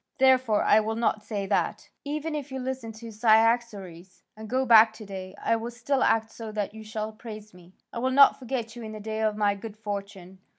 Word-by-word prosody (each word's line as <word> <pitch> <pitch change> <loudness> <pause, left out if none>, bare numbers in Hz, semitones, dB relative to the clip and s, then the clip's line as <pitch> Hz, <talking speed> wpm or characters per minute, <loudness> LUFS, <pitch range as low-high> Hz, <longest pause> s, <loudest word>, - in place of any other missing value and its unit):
Therefore 260 -5 +4
I 215 - +5
will 220 +1 -2
not 225 -2 0
say 205 -2 -4
that; - - +2
I - - -3
will - - -12
say - - -29
instead, - - -23 0.3
'Even 320 -1 -2
if 290 -2 -5
you 265 - -4
listen 255 -3 -4
to 225 +1 -10
Cyaxares 215 -5 +1
and 220 0 -10
go 260 +1 +1
back 225 -2 +7
to 220 -1 -11
day, 190 -1 -8
I 230 - +1
will 230 +1 -5
still 245 +3 -1
act 220 0 +2
so 225 -1 -8
that 210 -1 -3
you 220 0 -10
shall 215 0 -5
praise 215 -2 -10
me, 180 +1 -18 0.2
I 235 - -4
will 255 +2 0
not 275 +1 +6
forget 240 -3 -4
you 240 - -8
in 220 -1 -7
the 215 - -7
day 220 +1 -4
of 215 -1 0
my 205 -1 +2
good 210 +1 -9
fortune.' 200 -3 -7
220 Hz, 245 wpm, -26 LUFS, 210-235 Hz, 0.3 s, back